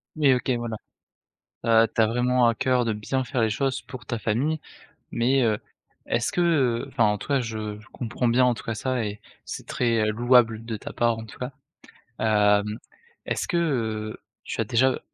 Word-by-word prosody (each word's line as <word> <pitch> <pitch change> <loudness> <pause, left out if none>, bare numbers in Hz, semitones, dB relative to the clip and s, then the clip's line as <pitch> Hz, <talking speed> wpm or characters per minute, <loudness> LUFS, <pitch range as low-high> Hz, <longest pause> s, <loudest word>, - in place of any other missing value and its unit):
Oui, 145 -4 +4
OK 125 +1 -1
voilà. 120 -2 -2 0.9
Heu, 115 0 +5
tu 115 - +2
as 110 - +5
vraiment 125 +1 +2
à 115 - +2
cœur 125 -1 +1
de 110 - 0
bien 130 +5 -2
faire 120 0 -2
les 110 - +3
choses 135 +4 -1
pour 130 -1 -10
ta 120 - -3
famille 135 +9 0 0.5
mais 130 +3 +2
heu, 110 -2 +2 0.5
est-ce 115 -1 0
que 180 - 0
heu 135 -9 +2
enfin, 130 -4 +1
en 105 -1 +2
tout - - -9
cas 140 -2 +2
je 110 -2 -4
je 110 - -18
comprends 120 0 -2
bien 125 +2 +4
en 125 -1 +3
tout - - -10
cas 115 - -2
ça 125 +1 -1
et 105 0 -5 0.2
c'est - - -7
très, 115 -3 +1
heu, - - +2
louable 115 -1 +3
de 115 -2 -4
ta - - -8
part 115 -1 +1
en 110 - -6
tout 110 - -13
cas, 125 +2 -4 0.7
heu, 105 -2 +4 0.6
est-ce - - -2
que 115 - -1 0.3
tu - - -3
as - - +2
déjà 130 +2 +2
115 Hz, 200 wpm, -25 LUFS, 110-130 Hz, 0.9 s, Heu